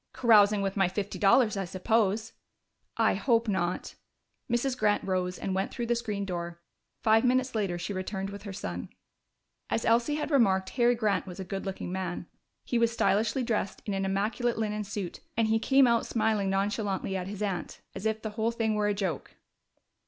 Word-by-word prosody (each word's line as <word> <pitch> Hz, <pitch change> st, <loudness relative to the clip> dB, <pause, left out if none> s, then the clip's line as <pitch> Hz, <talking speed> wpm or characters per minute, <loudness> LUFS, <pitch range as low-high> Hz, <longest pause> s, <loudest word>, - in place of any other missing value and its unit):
"Carousing 210 Hz, -4 st, +5 dB
with 195 Hz, 0 st, -1 dB
my 195 Hz, -2 st, +3 dB
fifty 195 Hz, +2 st, -4 dB
dollars, 215 Hz, +2 st, +4 dB
I 195 Hz, -, -1 dB
suppose." 215 Hz, +3 st, 0 dB, 0.6 s
"I -, -, +4 dB
hope 230 Hz, -2 st, +2 dB
not." 185 Hz, -3 st, -1 dB, 0.6 s
Mrs. 245 Hz, +2 st, +1 dB
Grant 210 Hz, -4 st, +1 dB
rose 185 Hz, -1 st, -1 dB
and 190 Hz, -, -3 dB
went 190 Hz, +1 st, 0 dB
through 240 Hz, -, -3 dB
the 240 Hz, +1 st, +1 dB
screen 210 Hz, -4 st, -3 dB
door. 170 Hz, -2 st, -5 dB, 0.4 s
Five 220 Hz, 0 st, +5 dB
minutes 255 Hz, +1 st, +2 dB
later 200 Hz, -6 st, -1 dB
she 175 Hz, +4 st, -4 dB
returned 190 Hz, +1 st, -4 dB
with 200 Hz, 0 st, -8 dB
her 200 Hz, -1 st, -7 dB
son. 90 Hz, -, -5 dB, 0.8 s
As 225 Hz, -, -1 dB
Elsie 235 Hz, +6 st, +3 dB
had 300 Hz, +1 st, -3 dB
remarked, 190 Hz, -8 st, +3 dB
Harry 245 Hz, -1 st, +3 dB
Grant 210 Hz, -5 st, 0 dB
was 180 Hz, 0 st, -8 dB
a -, -, -3 dB
good 195 Hz, +2 st, -5 dB
looking 190 Hz, -2 st, -4 dB
man. 180 Hz, -2 st, -3 dB, 0.4 s
He 240 Hz, -, 0 dB
was 230 Hz, 0 st, +3 dB
stylishly 225 Hz, +2 st, +1 dB
dressed, 220 Hz, -4 st, -2 dB
in 205 Hz, -, -2 dB
an 195 Hz, 0 st, -1 dB
immaculate 210 Hz, +5 st, 0 dB
linen 210 Hz, -1 st, -1 dB
suit, 200 Hz, -3 st, -5 dB, 0.2 s
and 225 Hz, -1 st, +2 dB
he 225 Hz, 0 st, +3 dB
came 270 Hz, +3 st, +5 dB
out 235 Hz, -1 st, +2 dB
smiling 215 Hz, -3 st, +1 dB
nonchalantly 195 Hz, 0 st, -1 dB
at 185 Hz, -1 st, -3 dB
his 205 Hz, +1 st, -5 dB
aunt, 195 Hz, -4 st, -3 dB
as 195 Hz, +3 st, -3 dB
if 220 Hz, 0 st, -2 dB
the 220 Hz, -, -3 dB
whole 220 Hz, +1 st, 0 dB
thing 225 Hz, -2 st, 0 dB
were 210 Hz, -1 st, +1 dB
a 205 Hz, -, +1 dB
joke. 195 Hz, -4 st, -3 dB
210 Hz, 190 wpm, -29 LUFS, 195-230 Hz, 0.8 s, Carousing